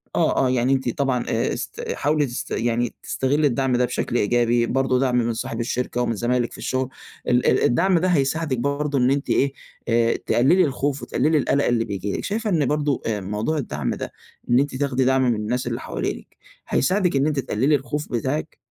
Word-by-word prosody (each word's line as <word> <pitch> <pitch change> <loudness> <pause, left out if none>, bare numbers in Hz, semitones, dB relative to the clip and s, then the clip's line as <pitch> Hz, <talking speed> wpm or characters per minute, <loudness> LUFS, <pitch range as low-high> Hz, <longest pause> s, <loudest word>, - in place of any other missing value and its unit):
آه، - - +2
آه - - +1
يعني 130 +1 +2
أنتِ 130 -2 0
طبعًا 130 -3 0
آآ، 115 - 0
است - - -5
حاولي 150 0 +1
تست 120 -2 -6
يعني 120 +1 0
تستغلي 145 +3 +1
الدعم 130 0 +1
ده 125 - +3
بشكل 120 - -3
إيجابي، 120 +2 +2
برضه 130 0 +1
دعم 130 -2 +1
من 115 -1 +1
صاحب 115 0 -4
الشركة، 125 +1 -2
ومن 115 -2 0
زمايلِك 120 +2 0
في - - -10
الشغل، 130 0 -2 0.4
ال 125 0 +2
ال - - +3
الدعم 175 +8 +3
ده 185 - +1
هيساعدِك 150 -3 +1
برضه 140 +1 -1
إن 125 0 +3
أنتِ 140 0 -1
إيه، 135 0 +2 0.3
آآ 115 0 +2
تقللي 155 +10 +3
الخوف، 140 0 -2
وتقللي 155 +4 +1
القلق 140 0 +1
اللي 115 -2 +1
بييجي 100 0 -3
لِك. - - -5
شايفة 215 +1 -2
إن 160 -7 +2
برضه، 145 -1 0
آآ، 105 -3 -1
موضوع 105 +11 -2
الدعم 75 - -2
ده، - - -6 0.4
إن 120 +2 +5
أنتِ 140 -1 -1
تاخدي 130 -1 0
دعم 130 0 +3
من - - +1
الناس 115 +4 -2
اللي - - -2
حوالينِك، - - -5 0.3
هيساعدِك 180 +2 +1
إن 135 +2 +2
أنتِ 150 -3 0
تقللي 135 +4 +1
الخوف 145 +2 -4
بتاعِك؟ 135 +6 -2
130 Hz, 200 wpm, -23 LUFS, 120-145 Hz, 0.4 s, إن